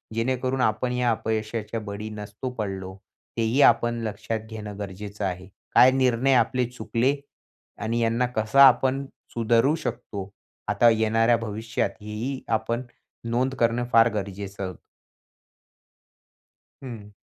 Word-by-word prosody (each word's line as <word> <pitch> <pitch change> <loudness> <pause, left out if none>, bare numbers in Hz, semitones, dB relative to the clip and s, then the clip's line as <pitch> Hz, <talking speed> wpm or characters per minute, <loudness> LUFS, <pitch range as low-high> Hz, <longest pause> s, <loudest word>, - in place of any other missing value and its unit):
जेणेकरून 130 +2 0
आपण 125 +2 +1
या 125 -1 +2
अपयशाच्या 110 0 -2
बळी 105 0 -6
नसतो 105 +4 -6
पडलो, 95 -3 -4 0.4
तेही 115 +5 +2
आपण 120 -3 +4
लक्षात 110 +1 -3
घेणं 105 -2 -7
गरजेचं 100 +1 -5
आहे. 95 0 -4 0.3
काय 130 - +8
निर्णय 130 0 +2
आपले 125 0 +2
चुकले 125 +3 0 0.7
आणि 115 +2 -1
यांना 115 +2 +2
कसा 110 +6 +5
आपण 130 +2 +2 0.3
सुधारू 115 +5 +3
शकतो, 110 -9 -5 0.4
आता 120 - +5
येणाऱ्या 115 +1 +3
भविष्यात, 110 +1 -2
हेही 110 +6 -4
आपण 115 +2 -1 0.5
नोंद 130 +3 0
करणं 120 +1 +2
फार 115 +1 +6
गरजेचं 100 -2 -5 2.1
हं. 110 -5 -8
115 Hz, 115 wpm, -25 LUFS, 105-125 Hz, 2.1 s, काय